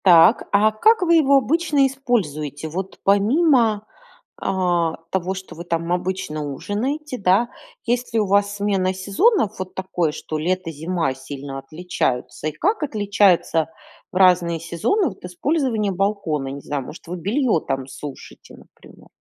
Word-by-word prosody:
Так, 175 +4 +6
а 210 +2 +4
как 435 - +3
вы 335 -1 +4
его 280 -4 +5
обычно 290 +2 +2
используете? 160 - -2
Вот 185 +4 -5
помимо, 220 - +3 0.6
а, 175 -3 +1 0.2
того, 190 0 -1
что 190 0 -9
вы 170 - -7
там 170 0 -1
обычно 180 -4 -2
ужинаете, 250 - -3
да? 195 +5 +3 0.4
Есть 245 +1 -1
ли 225 - +3
у 210 - +2
вас 200 +1 +2
смена 195 -2 0
сезонов, 210 - +1
вот 185 0 -6
такое, 180 -4 -1
что 155 0 -5
лето-зима 165 -2 -1
сильно 135 +1 -7
отличаются? 135 -4 -3
И - - -1
как 385 - 0
отличается 205 - +2 0.4
в - - -16
разные 180 -3 +4
сезоны 170 - 0
вот 195 - -14
использование 225 - 0
балкона? 185 -7 -1
Не 140 +1 -6
знаю, 140 -1 -3
может, 160 - -11
вы 180 +2 -5
бельё 220 - +1
там 135 -3 -3
сушите, 140 +1 -10
например. - - -18
190 Hz, 145 wpm, -21 LUFS, 165-230 Hz, 0.6 s, Так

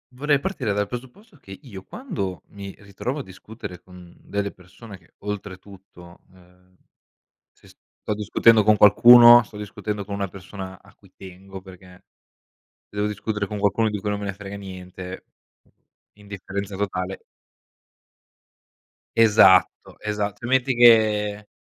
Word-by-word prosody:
Vorrei 145 +2 +1
partire 135 - -3
dal 105 0 -1
presupposto 130 - -10
che 95 -7 -12
io 100 -8 -11
quando 100 - -6
mi 100 -1 -10
ritrovo 105 +8 -6
a - - -5
discutere 95 -1 -11
con 90 -1 -16
delle 100 0 -4
persone 100 +3 -14
che, 85 -2 -28
oltretutto, 95 -3 -10
uhm, 90 0 -24 0.8
se - - -25
sto 105 - -8
discutendo 110 +2 +3
con 105 +1 +4
qualcuno, 120 +4 +8
sto 105 -1 -15
discutendo 105 0 -6
con 100 0 -6
una 100 -1 -3
persona 95 0 -10
a - - -22
cui - - -24
tengo 95 0 -11
perché 90 -1 -16 0.8
se - - -16
devo 105 0 0
discutere 105 0 -3
con 105 +1 -6
qualcuno 105 +2 +1
di 105 -1 -4
cui 105 +1 -3
non 105 - -2
me 100 - -6
ne 100 - -3
frega 100 0 -9
niente, 95 -1 -9 0.9
indifferenza 100 -1 -7
totale. 95 -1 -4 1.9
Esatto, 105 -5 +4
esat 105 -2 -3
tu 120 - -7
metti 130 +1 +1
che 105 -3 +4
100 Hz, 140 wpm, -23 LUFS, 95-110 Hz, 1.9 s, qualcuno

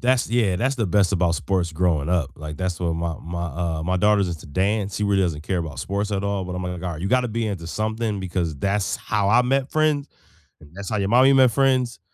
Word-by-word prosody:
That's 125 0 +2
yeah, 110 -7 +2
that's 130 +7 0
the 115 -4 -1
best 95 +1 +2
about 85 -3 +2
sports 90 -2 -1
growing 80 -2 0
up, 85 -6 +1
like, 75 0 -7
that's 90 -2 -2
what 85 -2 -1
my 85 -1 -3
my 85 +1 -4
uh, 80 0 -3
my 90 +3 0
daughter's 100 -1 +3
into 85 -3 -6
dance, 100 +6 -1
she 105 - -2
really 100 -1 +2
doesn't 80 -4 -2
care 95 +2 -1
about 80 -3 -5
sports 100 +2 -2
at 100 -1 -1
all, 100 -1 -1
but 90 0 -5
I'm 90 - -4
like, 90 - -3
"Oh, - - -3
my - - -7
god" 85 -3 -5
you 95 - -2
gotta 125 +2 +2
be 115 0 -2
into 95 -5 -4
something 110 +2 -2
because 90 -3 -2
that's 100 +5 0
how 105 -2 0
I 120 +3 +6
met 135 +2 0
friends, 155 -2 +1 0.5
and 75 -1 -16
that's 100 -1 -6
how 110 - 0
your 100 -1 0
mommy 130 +5 +6
met 130 -2 +6
friends, 130 -1 +1
95 Hz, 250 wpm, -23 LUFS, 85-110 Hz, 0.5 s, I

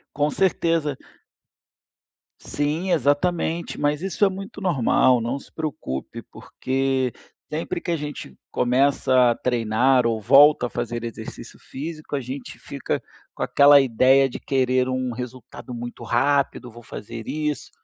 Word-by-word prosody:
Com 145 0 +1
certeza. 165 -6 0 1.4
Sim, 155 +6 -2
exatamente! 165 +3 0
Mas 145 +1 0
isso 195 +2 +1
é - - +3
muito 195 +1 -8
normal, 130 -7 +3
não 120 +4 -2
se - - -18
preocupe, 145 - -5
porque 130 -1 -2 0.4
sempre 165 +3 -3
que 170 - -4
a 170 - +2
gente 145 - -7 0.2
começa 130 -1 +3
a - - -1
treinar 125 +1 +2
ou 115 -1 0
volta 140 +3 +6
a - - -11
fazer 120 -1 -4
exercício 115 - -8
físico. 155 +2 -7
A 140 - 0
gente 130 +2 -8
fica - - -4 0.3
com - - -10
aquela 145 0 +6
ideia 135 +1 +4
de - - -7
querer 130 -1 +1
um 130 -1 -2
resultado 125 +1 -8
muito 120 0 -7
rápido, 130 +1 +1
vou 120 +1 -13
fazer 115 +2 -8
isso. 150 -2 -3
135 Hz, 140 wpm, -23 LUFS, 120-150 Hz, 1.4 s, volta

